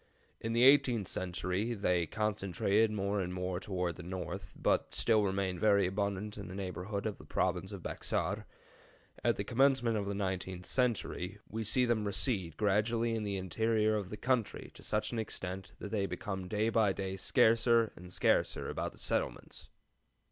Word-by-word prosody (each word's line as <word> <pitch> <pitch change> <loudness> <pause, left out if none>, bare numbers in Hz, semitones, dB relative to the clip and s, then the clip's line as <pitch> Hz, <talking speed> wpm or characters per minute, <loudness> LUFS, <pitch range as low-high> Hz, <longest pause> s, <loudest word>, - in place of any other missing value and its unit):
In 115 0 -3
the 120 +1 +4
eighteenth 125 -7 +5
century 90 +5 -1
they 90 -5 +1
concentrated 105 +1 +1
more 100 -1 -1
and 90 -1 -3
more 90 0 -2
toward 90 -3 -2
the - - -7
north, 90 +1 -6
but - - +1
still 110 -2 +4
remained 95 -2 -1
very 100 -1 +4
abundant 100 +2 -2
in 100 - -6
the 90 - -7
neighborhood 100 +2 -4
of 105 -2 -3
the - - -11
province 95 +2 -1
of 100 -4 -7
Bexar. - - -2 0.8
At - - +3
the - - -2
commencement 125 -3 +3
of 100 -1 -2
the 100 - -2
nineteenth 95 -2 -3
century 110 -6 0
we 110 +1 -4
see 125 +4 +3
them 120 -3 +1
recede 95 - -1
gradually 115 +3 +2
in 110 - -1
the 100 -2 -2
interior 110 +3 +1
of 100 -3 -3
the 105 - -6
country 125 0 -1
to - - -13
such 105 0 -1
an 120 - -2
extent 95 -3 -5
that 105 - -7
they 100 -3 0
became 95 -2 -4
day 105 +3 +1
by 110 -3 +3
day 95 0 -3
scarcer 115 +3 +3
and 90 +1 -11
scarcer - - +1
about - - -3
the - - -18
settlements. - - -2
100 Hz, 175 wpm, -33 LUFS, 95-110 Hz, 0.8 s, eighteenth